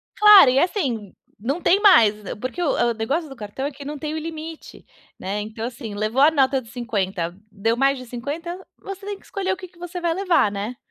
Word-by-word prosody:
Claro, 420 -9 +9
e, 265 - +3
assim, 255 - -1 0.3
não 275 - -2
tem 385 - +4
mais, 330 - +6
eh - - -5
porque 255 +10 -5
o 320 - +2 0.2
o - - 0
negócio 275 +9 -2
do 270 - -10
cartão 215 +4 -6
é 290 - -2
que 275 +1 -11
não 295 0 -5
tem 305 -1 -4
o - - -2
limite, 320 0 -8 0.3
né, 200 +2 -3
então, 220 +2 -6
assim, 235 -3 -7
levou 215 +6 0
a 300 - +7
nota 270 -3 +2
de 230 - -16
$50, 190 -8 -3 0.2
deu 225 +3 -1
mais 275 +1 +2
de 255 - -9
$50, 310 +10 -6
você 390 0 -8
tem 405 0 -4
que - - -23
escolher 385 -2 -2
o - - -6
que 370 0 -9
que 350 - -26
você 355 +1 -7
vai 340 -1 +1
levar, 355 - +2
né. 205 +5 -5
275 Hz, 230 wpm, -22 LUFS, 225-345 Hz, 0.3 s, Claro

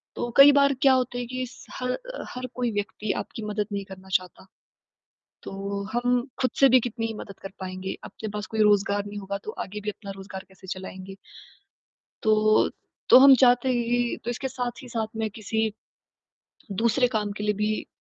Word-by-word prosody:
तो 240 - -3
कई 275 +1 +10
बार 280 0 +4
क्या 270 -1 +6
होता 250 -1 0
है 245 - -2
कि 255 +2 -5
इस 250 - -10 0.2
ह 250 0 0 0.4
हर 255 +1 -5
कोई 245 -2 0
व्यक्ति 205 0 -2
आपकी 225 - -6
मदद 210 0 -1
नहीं 200 0 -2
करना 190 0 -12
चाहता। 185 0 -1 1.0
तो 200 +1 -4
हम 245 0 +1 0.2
खुद 255 - +3
से 275 - +7
भी 255 +1 +7
कितनी 230 -1 -3
ही 225 - -5
मदद 200 -2 -9
कर 195 - -6
पाएँगे? 185 0 -5
अपने 220 - -7
पास 210 0 -4
कोई 220 -1 -1
रोज़गार 205 -1 +3
नहीं 205 0 -6
होगा 200 0 -4
तो - - -5
आगे 210 +2 -6
भी 210 - -3
अपना 205 -1 -7
रोज़गार 190 0 -8
कैसे 190 0 -17
चलाएँगे? 190 0 -7 1.1
तो 215 0 +4 0.4
तो - - +10
हम 270 +1 +9
चाहते 245 0 +5
ही 240 -1 +1
तो 240 - -1
इसके 255 +3 -3
साथ 245 0 -4
ही 255 - -10
साथ 225 -2 -2
में 220 0 -1
किसी 220 +1 -1 1.1
दूसरे 235 +2 +3
काम 215 -4 -1
के 210 - -5
लिए 210 0 +1
भी 210 +1 -1
220 Hz, 190 wpm, -26 LUFS, 200-245 Hz, 1.1 s, कई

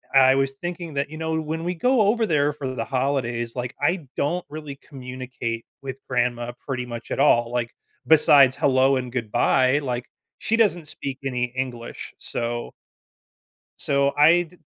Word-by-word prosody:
I 130 0 +7
was 135 0 +1
thinking 175 -2 -5
that, 140 +1 -1
you 155 - -8
know, 160 0 -1
when 160 +2 -4
we 180 +1 -1
go 250 +6 +3
over 220 +3 +3
there 150 -5 +2
for 140 -2 -5
the 130 - -3
holidays, 125 -3 -1
like, 125 0 -4
I 160 -1 0
don't 170 +5 -1
really 150 -2 -7
communicate 125 -4 -6 0.2
with 135 0 -6
grandma 120 -1 0 0.2
pretty 125 -2 -2
much 120 -1 -8
at - - -2
all. 120 -4 +4
Like, 120 -1 -2 0.3
besides 145 -4 +6
hello 135 0 +3
and 125 -2 -3
goodbye, 130 +3 +2
like, 125 -3 -3 0.3
she 225 - 0
doesn't 175 -9 +2
speak 140 -3 -6
any 125 -2 0
English. 125 -1 -6
So 120 0 -4 1.1
so 140 0 +1
I 165 +4 +6
d 175 +1 -17
135 Hz, 165 wpm, -24 LUFS, 125-155 Hz, 1.1 s, I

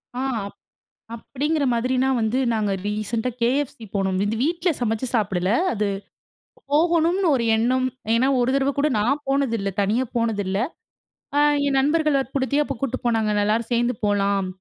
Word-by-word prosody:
ஆ - - -3 1.0
அப்டிங்கிற 290 +6 -2
மாதிரினா 255 +3 +1
வந்து 220 +4 0
நாங்க 210 -2 0 0.2
ரீசென்ட்டா 215 +3 -2
KFC 265 +4 0 0.2
போனோம். 190 -1 0
இந்த 210 +2 -1
வீட்ல 340 +5 +1
சமைச்சு 225 +1 -1
சாப்பிடல 190 -3 0 0.2
அது 210 -2 -1 0.9
போகணும்னு 340 +4 +2
ஒரு 235 - -1
எண்ணம். 255 +3 +1 0.3
ஏன்னா 255 +4 +3
ஒரு 245 - +2
தடவை 275 0 +1
கூட 295 - +3
நான் 255 +8 +1
போனதிலல 230 -8 0
தனியா 220 +6 +1
போனதிலல. 205 -4 0 1.1
என் 275 -1 +1
நண்பர்கள 305 +2 +2
வற்படுத்தி 270 +1 -2
அப்போ 275 - -4
கூட்டிட்டு 270 0 -3
போனாங்க 225 -2 +1
"எலலாரும் 215 +2 +1
சேர்ந்து 240 +1 +1
போகலாம். 200 -1 +1
240 Hz, 135 wpm, -23 LUFS, 215-275 Hz, 1.1 s, ஏன்னா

